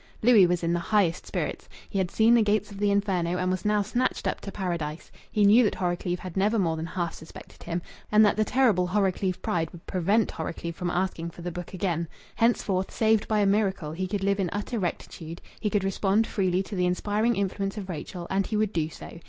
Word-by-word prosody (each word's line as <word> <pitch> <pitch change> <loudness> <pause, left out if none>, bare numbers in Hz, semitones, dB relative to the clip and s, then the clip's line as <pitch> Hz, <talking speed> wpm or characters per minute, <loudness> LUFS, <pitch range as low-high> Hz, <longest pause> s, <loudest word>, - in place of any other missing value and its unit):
Louis 220 -6 +7
was 175 0 0
in 170 0 +1
the 175 - +1
highest 185 -2 +1
spirits. - - -4 0.2
He 195 - -2
had 185 -2 0
seen 225 +4 +4
the 235 - +6
gates 210 0 +1
of 200 - -9
the 205 0 +2
Inferno, 190 -4 +1
and 185 0 0
was 185 0 -2
now 210 -1 +2
snatched 240 +5 -1
up - - -2
to 200 - -6
Paradise. 170 -5 -4 0.2
He 210 -1 +3
knew 220 +5 +7
that 210 - +1
Horrocleave 175 0 -1
had 185 -3 -7
never 205 +4 +2
more 170 -5 +1
than 160 +1 -4
half 170 -1 -3
suspected 160 - -12
him, 170 0 -3 0.3
and 215 +1 +7
that 205 - +3
the 215 - +2
terrible 220 -7 +2
Horrocleave 190 -1 0
pride 165 -2 0
would 170 - -14
prevent 195 +4 +1
Horrocleave 170 +1 -5
from 180 0 -3
asking 175 -2 -1
for 170 +1 -12
the 175 - -3
book 175 +2 -7
again. 170 -4 -1 0.3
Henceforth, 200 -5 +1
saved 220 -1 +2
by 215 -1 +2
a - - +3
miracle, 195 -6 +1
he 185 +4 -3
could 200 0 -3
live 200 0 +1
in 185 -3 0
utter 210 +3 -3
rectitude; 170 -2 -5 0.2
he 210 - 0
could 205 -2 0
respond 195 +3 +2
freely 185 -3 0
to 200 - -7
the 180 -1 +1
inspiring 210 +6 +1
influence 195 +1 -2
of 200 -3 -5
Rachel, 175 +1 -6
and 195 0 +1
he 215 - -1
would 215 -1 0
do 160 -2 0
so. 165 - -10
190 Hz, 225 wpm, -27 LUFS, 175-210 Hz, 0.3 s, Louis